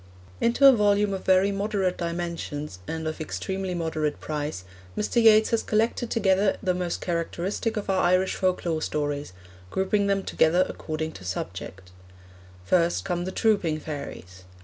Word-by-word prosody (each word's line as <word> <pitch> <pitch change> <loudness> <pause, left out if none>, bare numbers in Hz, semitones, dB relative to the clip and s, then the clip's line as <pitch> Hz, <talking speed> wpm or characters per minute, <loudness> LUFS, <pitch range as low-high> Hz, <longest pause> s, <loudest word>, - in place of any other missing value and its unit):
Into 235 +4 +3
a - - +10
volume 205 -3 +2
of 190 - -5
very 190 +1 +4
moderate 195 -2 -1
dimensions, 170 - -4
and 160 -1 -3
of 155 0 -4
extremely 190 +3 -3
moderate 155 -3 -2
price, 150 -10 -4 0.3
Mr. 220 +3 +1
Yeats 220 -1 +6
has 230 - +2
collected 225 +2 0
together 195 -2 +2
the 185 -2 +2
most 180 -1 -3
characteristic 180 +6 -2
of 210 - -3
our 190 -1 +2
Irish 185 +2 +3
folklore 180 -4 0
stories, 145 -5 -2 0.4
grouping 200 - +1
them 195 -1 +1
together 175 +2 +3
according 160 0 -4
to 95 - -12
subject. 90 0 -6 0.7
First 170 - +2
come 175 -2 -2
The 185 - -3
Trooping 190 -8 +1
Fairies. 95 - -8
180 Hz, 150 wpm, -26 LUFS, 155-200 Hz, 0.7 s, a